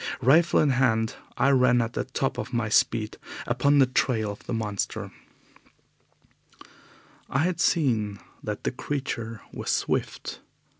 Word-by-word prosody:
Rifle 160 +7 +5
in 150 - +4
hand, 115 -4 +2 0.2
I 135 +3 +4
ran 125 -2 +4
at 115 0 -1
the - - -2
top 130 0 -2
of - - -5
my 115 -2 0
speed 110 0 +1 0.3
upon 140 +4 +2
the 135 - +7
trail 120 -4 0
of 100 - -11
the - - -4
monster. 105 -4 -3 2.2
I 135 +3 +1
had 175 0 -1
seen 110 - +1 0.2
that 105 -1 -5
the - - 0
creature 120 -5 -4
was - - -5
swift. - - -1
125 Hz, 140 wpm, -26 LUFS, 110-135 Hz, 2.2 s, the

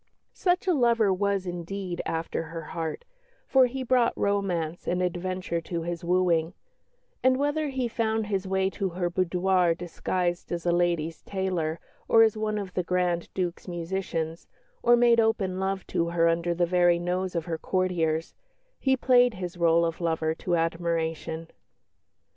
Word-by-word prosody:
Such 360 0 +1
a 365 - +4
lover 235 - +3
was, 200 0 0
indeed, 175 +1 -4
after 165 0 -2
her 165 0 -7
heart, 165 - -4 0.4
for 260 -2 +5
he 260 +2 -4
brought 250 -1 +2
romance 180 -5 -1
and 180 - 0
adventure 180 -1 -2
to 165 0 -4
his 170 0 -4
wooing; 175 -1 +1 0.7
and 260 0 +4
whether 290 +2 0
he 260 -2 -1
found 220 -1 -1
his 195 -2 -2
way 190 0 +1
to 195 -1 -2
her 175 0 -2
boudoir 180 0 +2
disguised 175 0 -2
as 170 -1 -3
a 175 - +3
ladies' 170 -2 0
tailor 180 -5 -2 0.3
or 225 - +7
as 220 -1 +3
one 215 0 -1
of 195 -3 -5
the 180 - 0
Grand 180 -1 0
Duke's 180 -1 -3
musicians, 170 -2 -3 0.3
or 240 - +6
made 235 -1 +5
open 200 -5 +1
love 190 0 -2
to 170 0 +1
her 170 0 +2
under 170 +1 +1
the 175 0 +2
very 175 0 +3
nose 180 +1 -2
of 165 -1 -1
her 165 -2 -3
courtiers, 165 -4 0 0.5
he 265 -1 +2
played 245 -2 +4
his 180 -1 -5
rôle 170 0 +4
of 165 +1 -5
lover 160 -1 0
to 175 +2 -1
admiration. 165 -1 -2
180 Hz, 160 wpm, -27 LUFS, 170-200 Hz, 0.7 s, or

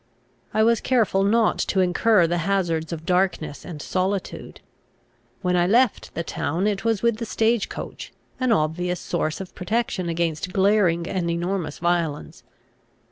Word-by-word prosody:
I 215 - +2
was 230 0 +3
careful 225 -6 +2
not 220 +3 +2
to 195 - 0
incur 185 +1 +4
the 175 +1 0
hazards 165 -3 0
of 165 -1 -6
darkness 180 -6 0
and 165 -4 -8
solitude. 190 +1 -3 0.8
When 180 0 +1
I 175 0 +3
left 240 +3 +2
the 170 - -2
town 165 +3 -2
it 205 -2 0
was 225 -2 0
with 235 -2 +2
the 230 - -4
stage 225 0 +1
coach, - - -7 0.3
an 255 -2 +1
obvious 180 -1 0
source 155 -3 -2
of 190 -2 -8
protection 185 -2 -2
against 165 +1 -2
glaring 190 -4 +3
and 180 -3 -1
enormous 170 -2 -2
violence. 170 -3 -1
185 Hz, 150 wpm, -23 LUFS, 170-210 Hz, 0.8 s, incur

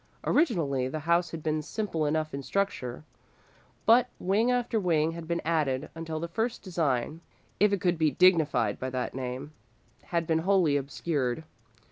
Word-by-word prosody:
Originally, 160 - +1
the 155 +4 -4
house 170 +2 +2
had 160 -1 -7
been 155 -1 0
simple 165 -3 -2
enough 155 +1 -1
in 140 - -3
structure, 155 -7 -2 0.8
but 240 +2 +6
wing 205 +6 +1
after 245 -2 +1
wing 165 -4 +2
had 165 -1 -8
been 170 0 -1
added 150 -4 0
until 160 -1 -5
the 170 - -3
first 225 +7 -2
design, 160 - -1 0.4
if 210 +1 +5
it 200 - 0
could 175 -2 +1
be 155 -1 +4
dignified 150 - +3
by 130 - -3
that 130 -1 -3
name, 130 +3 -5 0.5
had 170 -1 -1
been 160 0 +1
wholly 180 -4 +3
obscured. 140 -1 -1
160 Hz, 160 wpm, -28 LUFS, 145-185 Hz, 0.8 s, but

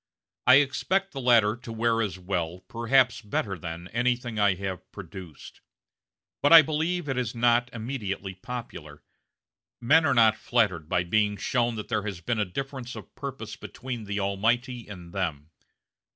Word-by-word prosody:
I 130 - +9
expect 190 +8 +2
the 135 - -5
latter 115 -4 +4
to 120 -1 -9
wear 115 0 +1
as 100 -5 -2
well 90 -2 -2
as, 90 - -16
perhaps 120 +1 +2
better 105 -2 -2
than, 85 -1 -7
anything 120 -2 -1
I 100 -2 +4
have 95 -1 -6
produced; 95 -4 -10 0.8
but 145 - +3
I 165 -1 +11
believe 160 +2 -1
it 135 -2 -1
is 125 -1 -3
not 120 +1 +3
immediately 110 -5 -4
popular. 90 -9 -8 0.8
Men 150 +7 +5
are 140 - +2
not 110 -2 +6
flattered 95 -10 0
by 90 - +2
being 105 +3 +1
shown 120 +2 0
that 105 - -6
there 105 - 0
has 100 -4 -5
been 110 +6 -2
a 105 - +2
difference 130 +4 -6
of - - -11
purpose 135 -6 -6
between 125 -4 -7
the 105 +1 -3
Almighty 115 +5 0
and 90 -4 -10
them. 80 -6 -3
115 Hz, 165 wpm, -27 LUFS, 95-125 Hz, 0.8 s, I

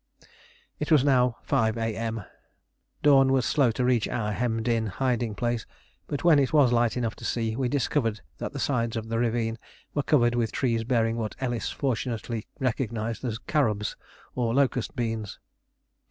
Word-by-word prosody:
It 150 - -3
was 150 -4 +6
now 125 -4 +3
5 110 0 +1
A.M. 115 -1 -2 0.8
Dawn 135 -2 +6
was 130 -2 +2
slow 140 -5 +3
to 125 +3 -1
reach 125 -3 +2
our 105 -3 -2
hemmed 115 +1 -1
in 115 -2 +1
hiding 120 0 -1
place; 120 0 -2 0.4
but 145 - -3
when 165 -4 +6
it 135 - +1
was 145 -6 +5
light 120 0 +2
enough 115 -2 -1
to - - -12
see, 115 -2 -1
we 130 0 0
discovered 120 -4 0 0.2
that - - -4
the - - -7
sides 115 -4 0
of 115 0 -4
the 115 0 0
ravine 115 -1 0 0.3
were 145 - +1
covered 120 -5 +3
with 120 -2 0
trees 115 -4 0
bearing 115 -1 +1
what 110 -3 -3
Ellis 120 -3 -2
fortunately 120 -4 -3
recognised 115 -3 -2
as 115 -4 -2
"carobs" 110 -7 0 0.4
or 120 -2 0
locust 130 -3 +1
beans. 115 -4 -3
120 Hz, 170 wpm, -27 LUFS, 115-130 Hz, 0.8 s, was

